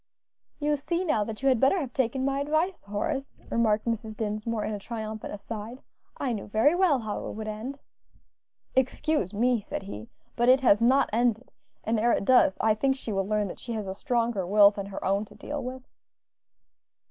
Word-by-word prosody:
"You 295 0 0
see 340 +6 -2
now 300 -11 +2
that 225 +3 -7
you - - +3
had 255 -3 +4
better 270 +9 +4
have 270 -6 -5
taken 260 0 0
my 275 0 0
advice, 310 +6 0
Horace," 270 +7 -3
remarked 220 -2 +2
Mrs. 220 -2 -3
Dinsmore, 215 +1 -2
in 215 - -3
a 205 - -4
triumphant 220 0 -6
aside; 220 +4 -7 0.3
"I 260 -4 -1
knew 210 - -5
very 220 +9 +3
well 350 -5 +3
how 215 -4 -4
it - - -5
would 215 0 -6
end." 220 +6 -5 1.0
"Excuse 260 - +1
me," 240 +3 +2
said 195 - -5
he, 110 - -8 0.3
"but 240 +1 +3
it 260 +1 +6
has 230 -4 +5
not 260 +4 +4
ended; 240 +1 +1 0.3
and 220 0 0
ere 235 +2 +3
it - - 0
does, 250 -6 +5
I 220 - +4
think 265 +5 +1
she 250 -4 -6
will 195 -1 -1
learn 210 -1 +1
that - - -8
she 235 - -5
has 215 -2 -3
a 190 - -4
stronger 230 -5 -1
will 200 +1 +7
than 200 -1 -6
her 195 - -6
own 195 +2 +1
to - - -17
deal 290 -2 -5
with." 255 +1 -6
230 Hz, 200 wpm, -27 LUFS, 210-265 Hz, 1.0 s, will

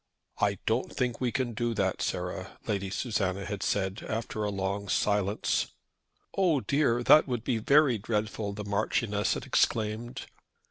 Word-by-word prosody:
"I 100 -1 +2
don't 115 +3 0
think 125 -2 -2
we 125 -2 +1
can 130 -2 -1
do 120 +1 -1
that, 95 -2 0
Sarah," - - -3
Lady 100 -2 -1
Susanna 100 -3 -1
had - - -4
said 95 +2 -1
after 110 -1 -2
a 105 - 0
long 100 0 -2
silence. 105 0 +1 0.6
"Oh 175 -7 +3
dear! 125 -3 +1
that 150 +5 +7
would 120 -4 -2
be 120 -2 0
very 140 0 +4
dreadful!" 105 0 -2
the 105 0 -6
Marchioness 105 0 0
had - - -5
exclaimed. 110 +2 0
110 Hz, 150 wpm, -29 LUFS, 100-120 Hz, 0.6 s, that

